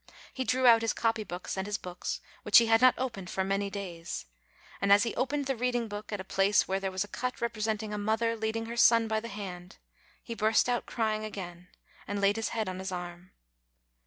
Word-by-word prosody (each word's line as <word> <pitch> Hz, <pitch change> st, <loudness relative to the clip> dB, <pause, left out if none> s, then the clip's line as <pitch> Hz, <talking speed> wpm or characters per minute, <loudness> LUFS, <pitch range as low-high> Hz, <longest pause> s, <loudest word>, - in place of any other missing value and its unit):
He 260 Hz, -, -2 dB
drew 255 Hz, 0 st, +1 dB
out 230 Hz, -2 st, +7 dB
his 225 Hz, -, 0 dB
copy 225 Hz, -1 st, 0 dB
books 180 Hz, -2 st, -6 dB
and 190 Hz, +1 st, -3 dB
his 210 Hz, 0 st, -1 dB
books, 180 Hz, -1 st, -5 dB, 0.2 s
which 210 Hz, +2 st, +6 dB
he 235 Hz, -, +7 dB
had 225 Hz, +1 st, +4 dB
not 255 Hz, 0 st, +6 dB
opened 230 Hz, -8 st, -4 dB
for 190 Hz, -, -1 dB
many 195 Hz, +1 st, -1 dB
days, 175 Hz, -, -6 dB, 0.6 s
and 200 Hz, -, +2 dB
as 205 Hz, +1 st, +7 dB
he 230 Hz, -, -2 dB
opened 285 Hz, +2 st, -1 dB
the 270 Hz, 0 st, -1 dB
reading 245 Hz, -1 st, -1 dB
book 205 Hz, 0 st, -7 dB
at 205 Hz, -, -3 dB
a -, -, -4 dB
place 195 Hz, +1 st, +2 dB
where 190 Hz, +1 st, 0 dB
there 195 Hz, 0 st, -2 dB
was 190 Hz, +1 st, -1 dB
a -, -, -10 dB
cut 250 Hz, +4 st, -4 dB
representing 215 Hz, -2 st, -2 dB
a 210 Hz, -, -3 dB
mother 220 Hz, +2 st, +1 dB
leading 220 Hz, +1 st, -2 dB
her 235 Hz, +1 st, -6 dB
son 230 Hz, -1 st, +5 dB
by 220 Hz, 0 st, 0 dB
the 230 Hz, -, -7 dB
hand, 190 Hz, -3 st, -8 dB, 0.5 s
he 235 Hz, -, -5 dB
burst 220 Hz, +1 st, +2 dB
out 245 Hz, -1 st, -1 dB
crying 215 Hz, -2 st, -1 dB
again, 180 Hz, -4 st, -7 dB, 0.4 s
and 205 Hz, 0 st, -2 dB
laid 200 Hz, +2 st, +3 dB
his 225 Hz, -, -1 dB
head 220 Hz, -3 st, -2 dB
on 185 Hz, 0 st, -4 dB
his 190 Hz, 0 st, -4 dB
arm. 175 Hz, 0 st, -7 dB
215 Hz, 225 wpm, -30 LUFS, 195-230 Hz, 0.6 s, out